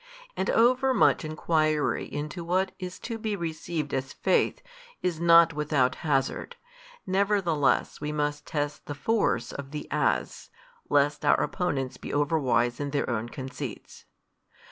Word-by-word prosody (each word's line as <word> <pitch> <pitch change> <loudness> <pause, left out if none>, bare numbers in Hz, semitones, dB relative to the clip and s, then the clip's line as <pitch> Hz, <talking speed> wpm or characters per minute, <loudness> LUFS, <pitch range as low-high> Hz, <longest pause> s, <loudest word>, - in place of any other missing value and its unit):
And - - -1
overmuch 255 -1 +4
enquiry 155 -1 0
into 155 +4 -4
what 185 +3 0
is 180 -1 -6
to 230 -1 -5
be 215 -1 -2
received 160 -3 -4
as 135 0 -2
faith, 190 - +1 0.4
is 175 -3 -1
not 170 -1 +6
without 150 -4 +1
hazard: 145 - -1 0.5
nevertheless 190 -9 +1
we 150 0 -2
must 145 -1 -2
test 145 -1 -3
the 145 - -4
force 205 - 0
of 140 -1 -7
the 150 +1 -6
As, - - -1 0.4
lest 145 0 +2
our - - +4
opponents 135 -8 -2
be - - -7
overwise 140 -5 +1
in 145 0 -2
their 140 0 -1
own 115 0 -2
conceits. 130 -1 -7
155 Hz, 135 wpm, -27 LUFS, 145-180 Hz, 0.5 s, not